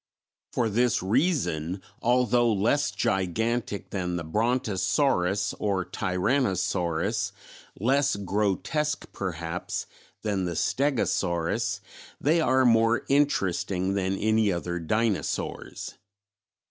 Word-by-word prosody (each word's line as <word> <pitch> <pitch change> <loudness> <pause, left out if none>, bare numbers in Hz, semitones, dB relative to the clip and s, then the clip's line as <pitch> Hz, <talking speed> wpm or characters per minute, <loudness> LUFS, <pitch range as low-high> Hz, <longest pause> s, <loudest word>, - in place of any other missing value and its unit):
For 120 - +1
this 115 -1 +1
reason 100 - 0 0.2
although 120 -1 +3
less 115 +8 +2
gigantic 105 +3 -1
than 90 -3 -2
the 85 - -3
Brontosaurus 105 - +1
or 95 -3 0
Tyrannosaurus, 95 - 0 0.5
less 135 +5 +2
grotesque 105 - -1
perhaps, 85 -2 -4 0.4
than 100 -4 0
the 85 -1 -3
Stegosaurus, 105 - 0 0.4
they 160 +4 +3
are 130 -2 +3
more 115 0 +4
interesting 95 -9 +1
than 95 0 0
any 110 0 +2
other 85 0 -2
dinosaurs. 105 +5 -2
105 Hz, 90 wpm, -27 LUFS, 95-120 Hz, 0.5 s, more